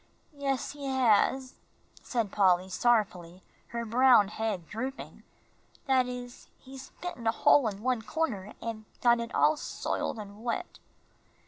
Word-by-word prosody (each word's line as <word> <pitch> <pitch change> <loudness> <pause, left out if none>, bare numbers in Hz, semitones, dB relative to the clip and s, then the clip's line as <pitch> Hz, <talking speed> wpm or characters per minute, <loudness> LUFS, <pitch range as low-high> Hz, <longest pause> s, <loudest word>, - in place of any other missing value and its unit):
"Yes, 275 -2 -2
he 285 -1 -7
has," 260 0 +2 0.5
said 230 -6 -2
Polly, 185 -2 +3
sorrowfully, 190 -5 0 0.2
her 235 0 -4
brown 240 -2 +5
head 215 -6 -3
drooping; 260 +5 -6 0.6
"that 260 -2 +3
is, 245 -1 -8
he's 265 0 -11
bitten 345 -11 -5
a - - +5
hole 255 +2 +4
in 205 0 -5
one 255 -2 +1
corner, 220 -8 -3
and 220 -1 -5 0.2
got 240 -1 +5
it 235 0 -5
all 310 - +4
soiled 260 - -3
and 205 +1 -10
wet." 245 +9 -4
235 Hz, 135 wpm, -29 LUFS, 210-260 Hz, 0.6 s, brown